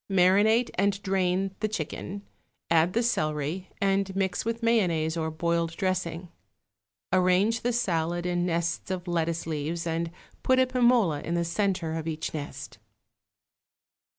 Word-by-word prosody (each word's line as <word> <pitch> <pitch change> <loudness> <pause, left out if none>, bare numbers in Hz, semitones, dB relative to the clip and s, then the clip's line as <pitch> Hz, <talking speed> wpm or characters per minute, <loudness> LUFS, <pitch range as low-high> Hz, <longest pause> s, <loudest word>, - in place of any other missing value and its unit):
Marinate 200 +6 +4
and 200 0 +2
drain 190 0 0
the 215 - 0
chicken, 200 +1 -5 0.5
add 165 +2 +4
the 235 - +2
celery, 155 -3 -1
and 195 -1 +1
mix 190 -1 0
with 230 +1 -3
mayonnaise 170 -9 +2
or 160 -1 -1
boiled 165 +1 -1
dressing. 180 -2 -2 0.8
Arrange 185 +5 +3
the 245 - 0
salad 175 -6 0
in 175 0 0
nests 170 0 -1
of 185 -1 -4
lettuce 170 -1 -1
leaves 160 +2 -3
and 165 0 -1 0.3
put 260 - +3
a 260 - +5
pim 250 -1 +3
ola 180 -12 +2
in 170 - -2
the 170 0 0
centre 180 -2 -1
of 160 0 -4
each 160 0 -3
nest. 145 -2 -7
180 Hz, 145 wpm, -27 LUFS, 165-200 Hz, 0.8 s, a